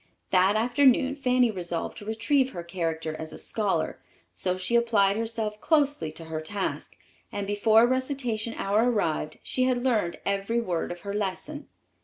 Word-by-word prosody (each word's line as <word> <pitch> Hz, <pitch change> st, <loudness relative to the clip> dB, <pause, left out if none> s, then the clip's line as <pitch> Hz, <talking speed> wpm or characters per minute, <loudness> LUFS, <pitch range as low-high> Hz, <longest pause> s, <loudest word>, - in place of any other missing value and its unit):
That 190 Hz, +2 st, +4 dB
afternoon 255 Hz, +3 st, +3 dB
Fanny 250 Hz, -4 st, +2 dB
resolved 175 Hz, -4 st, -3 dB
to 205 Hz, -, -11 dB
retrieve 260 Hz, +5 st, +1 dB
her 175 Hz, -, -5 dB
character 165 Hz, -2 st, -3 dB
as 160 Hz, 0 st, -6 dB
a -, -, -8 dB
scholar; 210 Hz, -3 st, -1 dB, 0.3 s
so 185 Hz, -1 st, -1 dB
she 185 Hz, +6 st, 0 dB
applied 215 Hz, -4 st, +3 dB
herself 220 Hz, -1 st, -3 dB
closely 290 Hz, -, +2 dB
to 165 Hz, -, -9 dB
her 160 Hz, -1 st, -4 dB
task, 195 Hz, +5 st, -4 dB, 0.4 s
and 205 Hz, -, -3 dB
before 215 Hz, +3 st, +4 dB
recitation 255 Hz, -3 st, -1 dB
hour 210 Hz, +5 st, +2 dB
arrived 160 Hz, -8 st, -1 dB
she 255 Hz, -, 0 dB
had 250 Hz, -1 st, +1 dB
learned 215 Hz, -10 st, +1 dB
every 200 Hz, +4 st, 0 dB
word 180 Hz, -9 st, -2 dB
of 175 Hz, 0 st, -7 dB
her 200 Hz, 0 st, -5 dB
lesson. 210 Hz, +9 st, -4 dB
215 Hz, 160 wpm, -27 LUFS, 185-245 Hz, 0.4 s, That